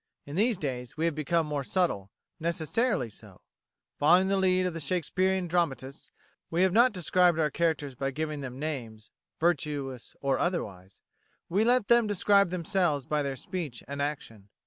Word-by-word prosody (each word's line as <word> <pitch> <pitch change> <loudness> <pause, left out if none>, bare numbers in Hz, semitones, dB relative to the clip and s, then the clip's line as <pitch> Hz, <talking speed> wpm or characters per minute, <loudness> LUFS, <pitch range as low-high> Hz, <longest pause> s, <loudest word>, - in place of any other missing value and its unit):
In 145 - -7
these 220 +3 +2
days 125 -4 -5
we 160 - 0
have 170 - +1
become 155 +2 0
more 145 -2 -2
subtle 130 - -1 0.3
necessarily 170 - 0
so. 110 - -15 0.6
Following 180 +6 +5
the 195 - +2
lead 185 -1 +2
of 180 - -1
the 165 - -5
Shakespearean 185 +4 0
dramatists, 150 -5 -2 0.4
we 170 +2 +2
have 190 -1 +3
not 240 +4 +6
described 180 -2 +2
our 155 -2 +1
characters 155 -4 0
by 135 +2 -2
giving 150 +1 -4
them 130 -2 -6
names 120 -8 -5 0.3
virtuous 145 -6 -1
or 135 -1 0
otherwise 100 - -3 0.5
we 195 +5 +2
let 245 -2 +3
them 235 -2 +5
describe 200 -1 +3
themselves 175 -5 0
by 150 0 0
their 140 -1 -2
speech 145 -4 -6
and 140 +1 -4
action. 115 -8 -5
160 Hz, 165 wpm, -28 LUFS, 140-185 Hz, 0.6 s, not